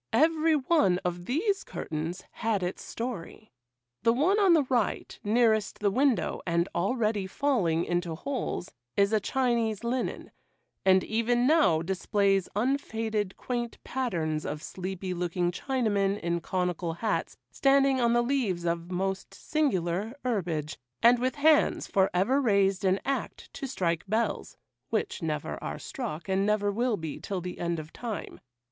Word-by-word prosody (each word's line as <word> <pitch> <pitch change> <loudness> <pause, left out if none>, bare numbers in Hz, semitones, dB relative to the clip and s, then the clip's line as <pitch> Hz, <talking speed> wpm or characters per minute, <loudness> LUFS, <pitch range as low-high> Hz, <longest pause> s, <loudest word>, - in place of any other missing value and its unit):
Every 315 +4 +4
one 270 - +3
of 175 0 -2
these 390 - 0
curtains 160 +4 -5
had 215 -4 -1
its 180 +1 -3
story. 225 -3 -6 0.5
The 230 - +4
one 350 - +3
on 390 -4 +6
the 315 -3 +5
right, 250 -4 -1
nearest 220 -1 +2
the 205 -1 +1
window, 255 - +1
and 170 0 +2
already 210 0 0
falling 190 - +1
into 175 -2 -1
holes, 255 - -3 0.3
is 200 +2 +3
a 215 - +4
Chinese 235 -2 0
linen, 245 +1 -2 0.5
and 190 -1 +5
even 240 +2 +1
now 270 - +4
displays 195 +1 +1
unfaded, 220 -4 -1
quaint 240 -2 -3
patterns 165 -12 -2
of 150 0 -5
sleepy 185 0 -4
looking 175 0 -1
Chinamen, 205 -3 0
in 170 0 -1
conical 180 -1 -1
hats, 210 +5 -2
standing 275 -1 +3
on 235 0 +3
the 240 0 +3
leaves 235 -10 0
of 170 0 -1
most 190 +1 -3
singular 210 - -1
herbage, 170 -10 -2 0.2
and 240 +1 +7
with 255 +3 0
hands 300 +1 +4
for 190 -1 +2
ever 225 +11 +2
raised 200 -5 +2
in 190 0 +3
act 275 +1 -3
to 275 - -5
strike 170 -10 -1
bells, 220 +4 -1 0.3
which 390 - -1
never 155 -3 -3
are - - -4
struck 205 - -6
and 190 0 +1
never 205 0 +2
will 235 +1 0
be 160 -4 -5
till 195 -2 -3
the 180 0 -6
end 170 -1 -1
of 155 0 -8
time. 230 -4 -6
205 Hz, 150 wpm, -28 LUFS, 180-250 Hz, 0.5 s, and